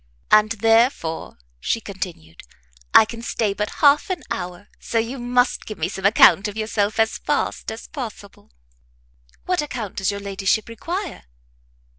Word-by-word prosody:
"And 215 Hz, +1 st, +5 dB
therefore," 225 Hz, -6 st, +1 dB, 0.2 s
she 230 Hz, -, -1 dB
continued, 185 Hz, -, -7 dB, 0.5 s
"I 220 Hz, -, +8 dB
can 230 Hz, +1 st, -8 dB
stay 220 Hz, -3 st, -1 dB
but 210 Hz, +1 st, -2 dB, 0.2 s
half 290 Hz, +6 st, +5 dB
an 370 Hz, -, -3 dB
hour; 180 Hz, +3 st, -5 dB
so 230 Hz, -, -3 dB
you 230 Hz, +4 st, -1 dB
must 245 Hz, +1 st, +1 dB
give 215 Hz, -, -6 dB
me -, -, -1 dB
some 195 Hz, +1 st, 0 dB
account 205 Hz, -1 st, +6 dB
of 210 Hz, +1 st, -7 dB
yourself 215 Hz, -1 st, -1 dB
as 225 Hz, 0 st, +2 dB
fast -, -, -2 dB
as 220 Hz, -, -8 dB
possible." 220 Hz, -, -9 dB, 0.9 s
"What 365 Hz, -3 st, +1 dB
account 240 Hz, -9 st, -5 dB
does 195 Hz, -, 0 dB
your 200 Hz, 0 st, -3 dB
ladyship 200 Hz, +1 st, -1 dB
require?" 340 Hz, -, -5 dB
220 Hz, 150 wpm, -22 LUFS, 200-240 Hz, 0.9 s, I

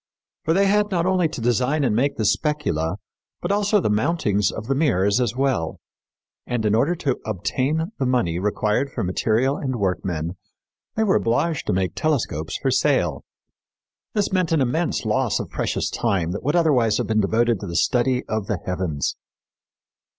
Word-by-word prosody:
For 160 Hz, -, +2 dB
they 200 Hz, +1 st, +4 dB
had 210 Hz, +1 st, +2 dB
not 175 Hz, -4 st, 0 dB
only 185 Hz, -2 st, +2 dB
to 150 Hz, -, -7 dB
design 125 Hz, +6 st, +1 dB
and 120 Hz, -5 st, +1 dB
make 140 Hz, +4 st, +1 dB
the 110 Hz, -, 0 dB
specula, 100 Hz, -, 0 dB, 0.4 s
but 175 Hz, -, -2 dB
also 205 Hz, +1 st, +3 dB
the -, -, 0 dB
mountings 105 Hz, -, +1 dB
of 110 Hz, -, -6 dB
the 135 Hz, -, 0 dB
mirrors 120 Hz, -, +2 dB
as 120 Hz, -1 st, 0 dB
well. 130 Hz, -12 st, 0 dB, 0.7 s
And, 120 Hz, -3 st, -1 dB
in 105 Hz, -, +2 dB
order 140 Hz, +11 st, +2 dB
to 140 Hz, -6 st, -1 dB
obtain 135 Hz, -, -1 dB
the 135 Hz, -, +1 dB
money 90 Hz, -10 st, +1 dB
required 105 Hz, +6 st, 0 dB
for -, -, -3 dB
material 110 Hz, +9 st, +1 dB
and 130 Hz, -3 st, -3 dB
workmen, 90 Hz, -4 st, -2 dB, 0.6 s
they 220 Hz, -, +2 dB
were 200 Hz, -3 st, +3 dB
obliged 145 Hz, +7 st, 0 dB
to -, -, +1 dB
make 95 Hz, -1 st, 0 dB
telescopes 110 Hz, -, -1 dB
for -, -, 0 dB
sale. -, -, +1 dB, 0.9 s
This 205 Hz, -2 st, 0 dB
meant 185 Hz, -3 st, +1 dB
an 165 Hz, -, +3 dB
immense 155 Hz, +6 st, 0 dB
loss -, -, +1 dB
of -, -, -6 dB
precious -, -, -1 dB
time 95 Hz, -8 st, 0 dB
that 100 Hz, -, -4 dB
would 145 Hz, +5 st, 0 dB
otherwise 135 Hz, -10 st, +3 dB
have 125 Hz, -, -1 dB
been 110 Hz, +1 st, +1 dB
devoted 115 Hz, +2 st, +1 dB
to 100 Hz, -, -6 dB
the 85 Hz, -, -5 dB
study 125 Hz, +8 st, +2 dB
of 110 Hz, -2 st, -2 dB
the 105 Hz, -, -1 dB
heavens. 90 Hz, -6 st, -2 dB
125 Hz, 180 wpm, -23 LUFS, 100-155 Hz, 0.9 s, they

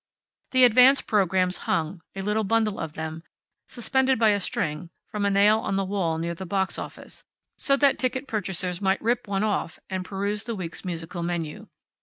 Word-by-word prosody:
The 255 Hz, -1 st, +4 dB
advance 250 Hz, +3 st, +7 dB
programs 185 Hz, -3 st, +1 dB
hung, 165 Hz, +2 st, -1 dB
a 195 Hz, -, -4 dB
little 210 Hz, +2 st, 0 dB
bundle 215 Hz, 0 st, +1 dB
of 160 Hz, -2 st, -4 dB
them, 160 Hz, 0 st, -5 dB, 0.5 s
suspended 265 Hz, +2 st, +1 dB
by 220 Hz, -1 st, +4 dB
a 205 Hz, -1 st, +2 dB
string 160 Hz, -3 st, -2 dB, 0.2 s
from 210 Hz, -1 st, -2 dB
a -, -, +3 dB
nail 205 Hz, +2 st, +4 dB
on 195 Hz, -, -2 dB
the 195 Hz, 0 st, 0 dB
wall 185 Hz, -5 st, -1 dB
near 170 Hz, +1 st, -2 dB
the 170 Hz, -, -7 dB
box 190 Hz, +1 st, -1 dB
office, -, -, -9 dB, 0.4 s
so 275 Hz, 0 st, +3 dB
that 280 Hz, -1 st, +3 dB
ticket 260 Hz, +1 st, -1 dB
purchasers 185 Hz, -4 st, -3 dB
might 190 Hz, 0 st, +2 dB
rip 230 Hz, 0 st, 0 dB
one 195 Hz, 0 st, 0 dB
off 205 Hz, -6 st, -1 dB
and 185 Hz, -1 st, -2 dB
peruse 200 Hz, +2 st, -3 dB
the 230 Hz, -1 st, -3 dB
week's 175 Hz, -4 st, -6 dB
musical 175 Hz, -1 st, -5 dB
menu. 170 Hz, -3 st, -4 dB
195 Hz, 185 wpm, -25 LUFS, 175-220 Hz, 0.5 s, advance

